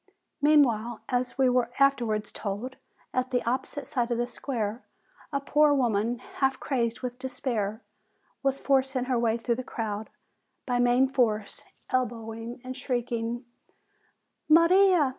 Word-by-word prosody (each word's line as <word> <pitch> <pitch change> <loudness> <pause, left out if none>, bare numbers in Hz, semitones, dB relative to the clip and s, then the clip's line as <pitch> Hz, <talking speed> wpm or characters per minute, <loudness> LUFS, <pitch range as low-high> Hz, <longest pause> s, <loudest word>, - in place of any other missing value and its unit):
Meanwhile, 240 -7 +3
as 250 0 -1
we 265 -1 +4
were 250 -1 +2
afterwards 240 -6 +2
told, 215 +5 -5 0.4
at 255 0 0
the 245 -3 -1
opposite 265 +3 -2
side 245 -2 -1
of 240 - 0
the 240 - +1
square 235 -3 -4 0.5
a 280 - 0
poor 295 +1 +4
woman, 235 -2 +1
half 265 +2 -1
crazed 235 -3 -1
with 250 -1 -5
despair, 235 -4 -3 0.6
was 275 0 0
forcing 265 -2 +2
her 250 -1 0
way 230 -1 +2
through 235 0 -1
the - - -10
crowd, 220 -3 -4 0.6
by 245 -2 0
main 245 +2 +4
force, 225 -6 0 0.3
elbowing, 230 -1 -3
and 255 0 -6
shrieking: 240 -2 -2 1.0
"Maria! 335 -1 +6
245 Hz, 135 wpm, -27 LUFS, 230-270 Hz, 1.0 s, Maria